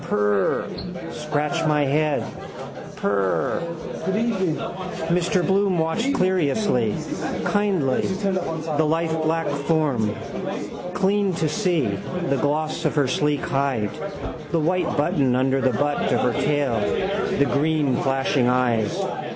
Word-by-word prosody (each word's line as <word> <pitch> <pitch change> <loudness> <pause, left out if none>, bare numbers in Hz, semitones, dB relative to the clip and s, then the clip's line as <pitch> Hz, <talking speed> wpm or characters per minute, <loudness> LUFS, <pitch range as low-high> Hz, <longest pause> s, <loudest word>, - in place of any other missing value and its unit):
Prr. 105 -1 -1
Scratch 150 +3 -1
my 150 -1 +3
head. 150 +1 +1 0.7
Prr. 95 - 0 1.5
Mr 180 +1 +2
Bloom 195 -1 +2
watched 220 +12 +1
curiously, 180 - +1 0.5
kindly 190 -11 +1
the 175 -6 -1
lithe 160 +1 +1
black 165 +1 0 0.2
form. 140 -10 +1 0.8
Clean 195 +1 +2
to 160 -1 0
see: 175 -3 +1
the 140 - -2
gloss 155 +3 0
of 155 - +1
her 145 -3 +3
sleek 145 +3 +1
hide, 135 -7 0 0.6
the 165 - +2
white 175 +3 +1
button 140 -3 +2
under 135 +1 +2
the 130 -1 +2
butt 145 0 0
of - - +2
her 125 - +2
tail, 145 -6 +1 0.6
the 140 - +4
green 145 -2 +1
flashing 135 -1 +1
eyes. 120 -4 +1
150 Hz, 110 wpm, -23 LUFS, 130-175 Hz, 1.5 s, the